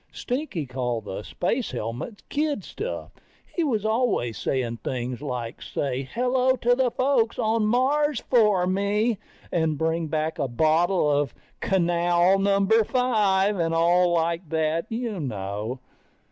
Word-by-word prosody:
Stinky 250 - -3
called 125 -3 -3
the 95 0 -5
space 220 - -2
helmets 120 - -5
kid 290 -7 -1
stuff. 450 - -6 0.4
He 345 - +1
was 225 -9 0
always 220 - +1
saying 120 -3 -2
things 125 +2 -4
like 125 -5 -5
say 135 -1 -3
hello 255 +1 +2
to 245 -1 +2
the 255 0 +2
folks 250 -2 +1
on 220 0 +1
Mars 280 +6 +2
for 210 -7 +3
me, 200 +4 +1 0.3
and 160 -3 +1
bring 160 +1 0
back 155 +1 -2
a 140 - 0
bottle 160 +7 +2
of 145 -3 +1 0.2
canal 175 0 +2
number 200 +3 +3
five, 210 -5 +2
and 165 -1 +1
all 175 +2 +4
like 170 0 0
that, 160 +1 0
you 225 -3 -3
know. 105 -1 -4
180 Hz, 135 wpm, -25 LUFS, 145-225 Hz, 0.4 s, all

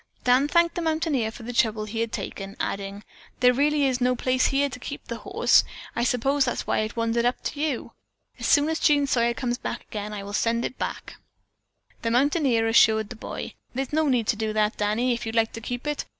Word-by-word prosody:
Dan 250 +3 +4
thanked 340 +2 +3
the 345 - -3
mountaineer 315 -8 0
for 225 - -11
the 245 +2 -5
trouble 220 -2 +1
he 220 +2 -5
had 230 -1 -1
taken, 195 0 -6
adding, 200 +1 -4 0.4
"There 250 0 +5
really 290 +2 +2
is 260 -2 0
no 250 0 +3
place 255 +1 +2
here 280 +1 +2
to 250 -2 -8
keep 280 - -7
the 235 - -5
horse. 400 +4 +3 0.3
I 235 - 0
suppose 270 +3 +2
that 245 - 0
is - - -4
why - - +1
it 215 -1 -2
wandered 230 0 0
up 245 +1 0
to 290 - -4
you. 300 -6 -2 0.5
As - - -2
soon 290 -1 +4
as 320 - -1
Jean 290 -2 +4
Sawyer 235 -3 +1
comes 245 -1 -2
again, 210 0 -5
I 205 -1 -5
will 200 +1 -8
send 230 +2 +1
it - - -6
back." - - -5 0.8
The 230 - -1
mountaineer 255 -2 +2
assured 220 -1 +4
the 245 - -7
boy: 220 - -6 0.4
"No 310 0 +2
need 250 -4 +2
to 220 - +1
do 215 0 -2
that, 215 0 +1
Danny, 215 +4 +1
if 235 -1 -4
you'd 225 - -4
like 225 -1 +2
to 225 - -7
keep 245 +3 -5
it. 295 -1 -2
240 Hz, 220 wpm, -25 LUFS, 225-280 Hz, 0.8 s, There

